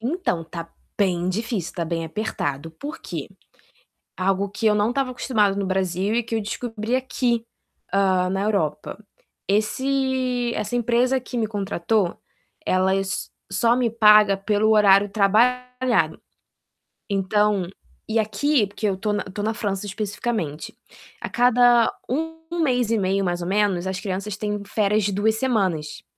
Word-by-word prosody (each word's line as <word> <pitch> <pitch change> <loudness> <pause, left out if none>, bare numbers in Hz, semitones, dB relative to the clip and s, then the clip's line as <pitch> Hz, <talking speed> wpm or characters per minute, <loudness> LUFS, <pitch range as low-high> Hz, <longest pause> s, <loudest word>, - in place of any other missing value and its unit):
Então, 240 - -1
tá 165 0 -7 0.3
bem 180 -3 +1
difícil, 210 -2 -3
tá 170 - -2
bem 165 0 -2
apertado. 160 -5 -3
Por 295 - -8
quê? - - -6 0.9
Algo 195 +1 0
que 220 +3 -5
eu 210 - +5
não 210 +2 +2
estava 265 0 -1
acostumada 210 -5 +1
no 200 - -1
Brasil 190 +2 0
e 240 - +1
que 230 0 -4
eu 220 - 0
descobri 225 +2 -3
aqui, 245 -3 0 0.5
hã, 190 -2 +2
na 195 +1 -1
Europa. 160 -9 -1 0.5
Esse 255 +3 0
essa 210 +3 -2
empresa 245 +2 +2
que 250 0 -7
me 225 -2 0
contratou, 200 -2 -1 0.5
ela 190 +1 +2
s 195 0 -2 0.2
só 230 +5 +3
me 245 -2 +1
paga 210 -3 +6
pelo 210 +2 +1
horário 205 -1 +5
trabalhado. 250 +5 +2 0.9
Então 200 -1 +1 0.4
e 220 +1 +1
aqui, 220 +3 +1
porque 205 +2 -3
eu 195 -2 0
tô 210 +2 -1
na 205 - -1
tô 200 +2 -6
na 220 +1 0
França 205 -3 -3
especificamente, 205 -5 -4 0.4
a - - -4
cada 245 -1 +4 0.2
1 325 +5 -2 0.3
mês 245 -5 +1
e 230 - +3
meio, 195 0 +1
mais 175 -1 -1
ou 175 - -4
menos, 195 -2 +1
as 190 0 -3
crianças 195 0 -4
têm 210 -1 -3
férias 210 +1 +1
de 205 - 0
2 220 +2 +2
semanas. 195 - -1
210 Hz, 150 wpm, -23 LUFS, 190-235 Hz, 0.9 s, paga